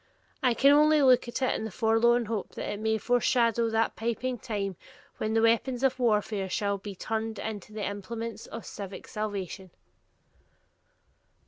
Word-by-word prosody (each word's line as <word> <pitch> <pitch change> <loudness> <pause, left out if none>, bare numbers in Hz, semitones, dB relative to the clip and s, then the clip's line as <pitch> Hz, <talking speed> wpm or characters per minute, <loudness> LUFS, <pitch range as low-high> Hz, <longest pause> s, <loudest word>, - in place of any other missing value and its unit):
I 250 -4 +3
can 275 +3 +6
only 300 0 +5
look 255 -2 +5
at 240 +2 -3
it 255 - +2
in - - -3
the 220 - -3
forlorn 230 +3 +3
hope 220 -2 -4
that - - -4
it 205 - -6
may 220 0 +1
foreshadow 235 -1 +2
that 225 0 +1
piping 235 +2 -2
time 200 -5 -3 0.4
when 215 +1 -1
the 225 - +3
weapons 235 +3 +2
of 260 -1 +2
warfare 210 -4 +1
shall 200 +1 -1
be 200 0 -7
turned 220 +2 -3
into 210 -1 -6
the 210 -1 -4
implements 225 +3 -5
of 230 - -8
civic 200 -2 -8
salvation. 200 -3 -4
225 Hz, 160 wpm, -28 LUFS, 210-240 Hz, 0.4 s, can